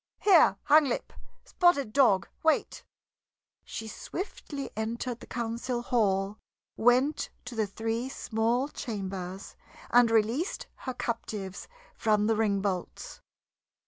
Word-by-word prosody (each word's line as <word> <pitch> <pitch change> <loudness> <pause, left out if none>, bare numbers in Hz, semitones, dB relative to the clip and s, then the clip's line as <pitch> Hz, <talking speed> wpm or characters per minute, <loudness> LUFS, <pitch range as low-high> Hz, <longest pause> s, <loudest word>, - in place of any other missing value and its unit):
"Here, 345 - +5
Hanglip, 295 -4 +3 0.3
Spotted 285 - +2
Dog, 220 -9 +4
wait!" 320 -1 +1 0.8
She 225 - -6
swiftly 285 - -6
entered 235 +2 -3
the - - -12
council 240 +1 -3
hall, 200 -4 +1 0.4
went 250 +6 +3 0.2
to 250 - -7
the 220 -2 0
three 225 +4 -3
small 235 +2 0
chambers, 195 -7 -6 0.4
and 245 -1 +6
released 230 - +1 0.2
her 255 - -4
captives 210 -5 -4 0.3
from 210 -1 +2
the 225 +1 +2
ring 205 -3 +1
bolts. 190 -3 -4
230 Hz, 110 wpm, -29 LUFS, 210-255 Hz, 0.8 s, and